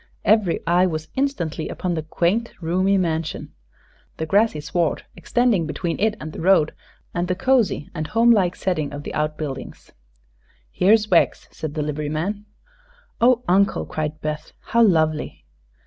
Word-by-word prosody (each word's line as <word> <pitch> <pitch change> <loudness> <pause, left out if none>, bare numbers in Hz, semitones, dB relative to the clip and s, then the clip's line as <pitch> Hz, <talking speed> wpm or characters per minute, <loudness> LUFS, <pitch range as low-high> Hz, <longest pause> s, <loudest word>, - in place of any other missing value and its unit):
Every 210 -4 +3
eye 175 +2 +3
was 155 -2 -4
instantly 185 - -2
upon 180 -1 -3
the 160 - -2
quaint, 180 +9 -1
roomy 185 +4 +1
mansion, 165 -3 -2 0.6
the 160 - -2
grassy 200 0 +2
sward 155 +3 -1
extending 235 -9 +1
between 165 +3 -3
it 215 +1 +1
and 155 0 -7
the - - -7
road, 170 -4 +4 0.4
and 175 0 -1
the 180 - 0
cosy 235 - +1
and 155 -3 -4
home 230 +2 +4
like 185 -5 +3
setting 155 -6 -2
of 145 0 -6
the - - -6
outbuildings. 150 -2 -4 0.8
"Here's 210 - +3
Wegg's," 170 - +3
said 155 -1 -6
the 155 - -1
liveryman. 155 +8 -3 0.7
"Oh, 245 0 +4
Uncle," 195 +3 +2
cried 155 0 -4
Beth; 155 0 -4
"how 235 - +1
lovely!" 155 - +1
175 Hz, 145 wpm, -22 LUFS, 155-205 Hz, 0.8 s, road